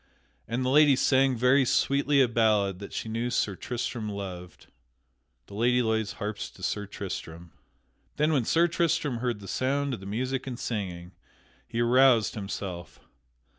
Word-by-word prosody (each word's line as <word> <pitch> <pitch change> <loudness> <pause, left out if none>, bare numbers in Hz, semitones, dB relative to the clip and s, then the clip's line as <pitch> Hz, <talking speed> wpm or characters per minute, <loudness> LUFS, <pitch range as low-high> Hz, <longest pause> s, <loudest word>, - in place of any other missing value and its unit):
And 125 +2 -2
the - - +1
lady 145 0 +6
sang 130 -1 +3
very 125 +4 +4
sweetly 140 +2 +2
a - - +2
ballad 105 -5 +1
that 100 - -8
she - - -4
knew 115 +2 -2
Sir 100 -4 0
Tristram 120 0 -4
loved. 90 -3 -7
[Sidenote: - - -22 0.7
The - - -14
Lady 120 +4 +2
Loise 110 -2 -1
harps 105 0 -5
to 95 - -16
Sir 105 +2 -2
Tristram] 85 -3 -7 0.6
Then 150 +2 +2
when 135 -5 +2
Sir 170 +7 +3
Tristram 160 -6 0
heard 120 -3 -2
the 100 - -10
sound 140 +3 -1
of 115 - -4
the 95 - -10
music 130 +6 -3
and 125 -2 -5
singing 90 -6 -4 0.6
he 115 - -2
aroused 120 -1 +4
himself. 95 -5 -6
115 Hz, 165 wpm, -27 LUFS, 100-130 Hz, 0.7 s, lady